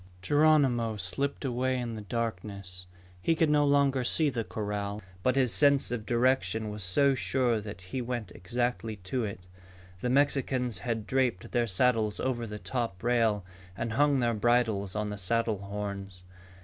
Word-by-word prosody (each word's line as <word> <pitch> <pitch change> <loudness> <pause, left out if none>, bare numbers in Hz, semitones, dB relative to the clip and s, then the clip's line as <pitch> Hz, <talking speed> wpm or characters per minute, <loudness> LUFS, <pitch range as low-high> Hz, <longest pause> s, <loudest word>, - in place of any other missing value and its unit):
Geronimo 135 -6 +3
slipped 140 +11 -2
away 130 0 0
in 120 -2 -3
the 110 - -6
darkness. 100 -4 -4 0.3
He 165 - +2
could 160 -1 +2
no 150 -1 +4
longer 140 -2 +3
see 150 +4 +3
the 115 -2 -2
corral, 105 -1 -4 0.2
but 130 +6 +2
his 130 -6 +3
sense 140 +9 +4
of 110 -3 -4
direction 115 -4 +1
was 105 0 -6
so 135 +11 +3
sure 125 -3 +1
that 100 -2 -8
he 95 +8 -4
went 120 -6 -4
exactly 120 +2 -2
to 110 +5 -3
it. 100 -2 -6 0.6
The 125 - -1
Mexicans 130 -3 +1
had 115 -3 -3
draped 125 -7 0
their 120 -1 +1
saddles 110 0 +1
over 120 -3 -1
the 105 0 -6
top 115 -5 -4
rail 115 -5 +2 0.3
and 115 - -2
hung 145 +2 +3
their 120 -1 +2
bridles 110 -3 +1
on 105 0 -2
the 105 - -5
saddle 110 +2 0
horns. 100 -2 -6
115 Hz, 160 wpm, -29 LUFS, 105-130 Hz, 0.6 s, no